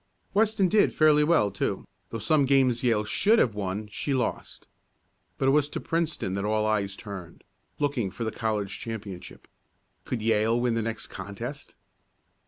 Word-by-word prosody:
Weston 210 -1 +3
did 210 +3 +3
fairly 150 -1 +5
well, 150 -11 +3
too, 100 - -2 0.2
though 115 - -4
some 140 +7 +2
games 130 -3 +3
Yale 115 -5 +2
should 205 - +3
have 120 - +3
won 105 +1 -3
she 120 +7 -2
lost. 125 - -3 0.7
But 135 - +2
it - - +5
was 145 0 +3
to - - -4
Princeton 165 - -1
that 100 0 -2
all 110 +1 +1
eyes 100 -2 0
turned, 95 -6 -9 0.3
looking 140 -8 0
for 115 - -6
the 110 - -2
college 105 -3 -2
championship. 100 -5 -8 0.6
Could 115 -4 -4
Yale 110 +1 +2
win 120 -1 +1
the 115 - 0
next 115 0 -4
contest? 100 +9 -7
115 Hz, 165 wpm, -27 LUFS, 105-145 Hz, 0.7 s, fairly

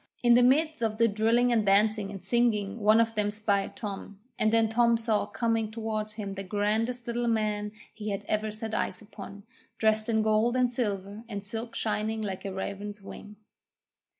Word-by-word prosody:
In 240 -1 +6
the 245 - +6
midst 305 +4 +3
of 220 -2 0
the 230 0 +4
drilling 230 +3 +2
and 225 -2 +3
dancing 205 +1 +3
and 195 -3 -8
singing 220 -2 +1
one 215 +1 +5
of 225 0 +2
them 210 -1 0
spied 200 -1 0
Tom, 200 -1 -7 0.2
and 215 - +3
then 225 0 +4
Tom 235 +1 +3
saw 220 -3 +1
coming 225 -2 -1
towards 220 -1 -3
him 205 -2 -5
the 195 - -5
grandest 220 +5 -1
Little 240 0 -2
Man 210 -2 0 0.2
he 215 -1 -5
had 200 0 -3
ever 215 0 0
set 220 +1 -6
eyes - - -1
upon, 200 -1 -10 0.3
dressed 220 0 +1
in 220 -1 +2
gold 220 +3 +2
and 250 -1 +2
silver, 205 -3 -3
and 200 -2 -5
silk 225 +3 -5
shining 220 0 -1
like 195 -1 -5
a 195 - -3
raven's 200 +2 -5
wing. 205 +1 -11
215 Hz, 185 wpm, -28 LUFS, 205-230 Hz, 0.3 s, In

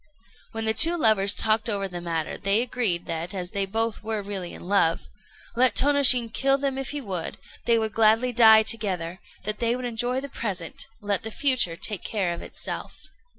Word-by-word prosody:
When 225 0 -5
the 220 - +4
two 330 +10 +5
lovers 215 - +3
talked 220 +1 +1
over 200 -2 -1
the 175 -2 -7
matter, 165 -2 -3
they 200 +4 +1
agreed 225 -9 -1
that, 170 +4 -5
as 180 -1 -4
they 200 -1 -1
both 225 +2 -2
were 215 -1 -3
really 195 -3 -5
in - - -11
love, 185 -4 +1 0.5
let 250 -1 +3
Tônoshin 260 -5 +4
kill 270 0 +2
them 275 -1 -3
if 270 - -4
he 295 - -3
would, 190 -10 -5 0.3
they 235 -1 +3
would 220 -1 -2
gladly 225 +3 +2
die 220 -2 +6
together: 190 -6 +1 0.2
they 230 +4 -1
would 255 0 -6
enjoy 245 +2 -2
the 280 - -6
present; 195 -10 -5
let 205 -1 -1
the 220 - -6
future 245 -8 +2
take 205 +3 -3
care 190 -5 -2
of 170 - -8
itself. - - -8
220 Hz, 190 wpm, -24 LUFS, 195-245 Hz, 0.5 s, die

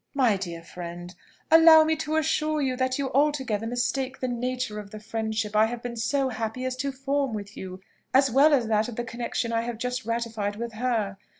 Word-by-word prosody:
"My 250 -7 +4
dear 170 -3 -6
friend, 175 +1 -8 0.4
allow 325 -1 +9
me 315 0 +1
to 310 0 -2
assure 310 0 +1
you 265 -3 0
that 255 0 0
you 275 -2 -2
altogether 265 -6 +1
mistake 255 +2 -2
the 255 - -2
nature 250 -2 -2
of 205 -1 -9
the 215 - -9
friendship 220 -1 -3
I 215 +1 +5
have 240 +1 -6
been 245 -1 -5
so 265 +4 0
happy 225 +2 -4
as 255 0 -2
to 275 +2 -2
form 270 -2 -1
with 205 -1 -7
you, 185 0 -8 0.3
as 265 0 +4
well 280 +5 +6
as 265 -5 +3
that 220 -1 +1
of 235 - -7
the 240 - -2
connexion 235 0 -3
I 230 - +2
have 235 -1 -4
just 250 +2 -3
ratified 225 -3 -2
with 230 +1 -5
her. 220 -4 -1
240 Hz, 210 wpm, -26 LUFS, 215-265 Hz, 0.4 s, allow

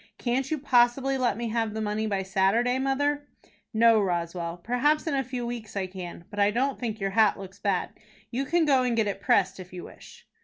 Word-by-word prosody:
"Can't 260 +2 -1
you 315 - 0
possibly 265 0 +3
let 245 -5 0
me 235 -1 -3
have 225 -1 -1
the - - -2
money 215 +1 -1
by 195 -2 -1
Saturday, 205 +7 +2
mother?" 285 +2 0 0.4
"No, 225 -1 +5
Roswell. 170 -2 -2
Perhaps 250 - +1
in 315 - -1
a 270 -1 +1
few 250 -1 -4
weeks 235 -4 -6
I 190 - 0
can. 180 -2 -8
But 205 - -6
I 200 0 +5
don't 260 +5 0
think 225 -3 -3
your 195 -1 -1
hat 220 0 +4
looks 195 0 -10
bad. 200 -3 -1 0.4
You 265 +3 -1
can 335 +3 +2
go 275 -3 +4
and 250 -2 0
get 220 - +3
it 200 -1 -3
pressed 195 -1 +2
if 185 0 -10
you 180 -1 -8
wish." - - -14
225 Hz, 220 wpm, -27 LUFS, 195-260 Hz, 0.4 s, No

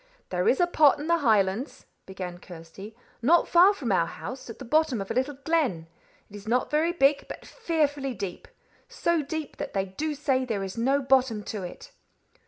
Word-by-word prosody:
"There 180 0 -1
is 265 - +2
a 355 - +5
pot 310 -5 +4
in 295 - -5
the 335 +1 +2
Highlands," 215 -1 +1 0.2
began 180 -2 -7
Kirsty, 180 +5 -11 0.3
"not 325 +8 +4
far 355 +3 +6
from 275 - -3
our 170 -3 +2
house, 255 +6 -8
at 230 - -8
the 265 - -9
bottom 305 -2 +2
of 195 - -5
a - - 0
little 260 +3 -1
glen. 285 - 0 0.4
It 205 - -14
is 205 +1 -11
not 245 +3 0
very 315 +3 +2
big, 280 -4 +2
but - - -9
fearfully 290 - -1
deep; 190 -4 -6 0.4
so 340 -9 0
deep 300 +1 -5
that - - -5
they 195 -1 0
do 295 +11 -4
say 270 -2 0
there 220 -6 -2
is 190 -1 -6
no 270 +4 +1
bottom 255 -5 +2
to 210 - -4
it." 325 - -9
260 Hz, 195 wpm, -26 LUFS, 200-305 Hz, 0.4 s, far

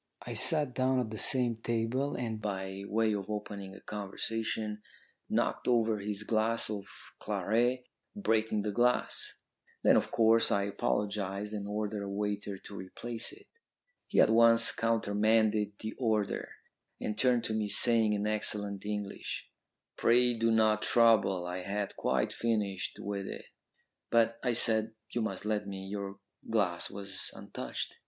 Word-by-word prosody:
I 120 - -5
sat 145 +3 +7
down 130 0 +1
at 115 -4 -3
the 110 - -5
same 120 -3 +4
table, 115 +5 -1
and, 115 -3 -4
by 95 -1 -4
way 110 +1 +1
of 100 -1 -4
opening 100 -2 -6
a - - -11
conversation, 105 +1 -4 0.5
knocked - - -1
over 115 -3 +2
his 105 +1 -3
glass 110 +1 +1
of 100 -2 -5 0.3
claret, 120 +4 0 0.3
breaking 110 - 0
the 105 - -2
glass. 120 +4 +1 0.5
Then, - - +6
of - - +2
course, 115 0 +4
I 100 - +2
apologised 100 0 -2
and 100 -1 -4
ordered 105 0 -3
a 100 - -5
waiter 100 0 -3
to 100 - -11
replace 110 +5 -5
it. 405 +1 -15 0.6
He - - +1
at - - +6
once 115 0 +6
countermanded 110 -1 +1
the 110 - -4
order, 110 -5 -1 0.5
and 105 - -3
turned 125 0 +3
to 110 - -1
me, 110 -1 -1
saying 110 +1 +4
in 105 0 -1
excellent 105 -2 -1
English, 105 -1 -5 0.5
'Pray 125 +1 +4
do 115 0 0
not 110 -1 +3
trouble. 110 -7 +3
I 90 +1 -4
had 100 +2 -4
quite - - 0
finished 105 -5 -2
with 100 -1 -4
it.' - - -7 0.6
"'But,' 115 0 +2
I 125 - +1
said, 110 -1 +2 0.2
'you 120 - -1
must 100 -3 -3
let 105 -1 -1
me. 95 -1 -6
Your 100 0 -5 0.3
glass 100 -6 0
was 100 -1 -5
untouched.' - - -6
110 Hz, 150 wpm, -31 LUFS, 100-115 Hz, 0.6 s, sat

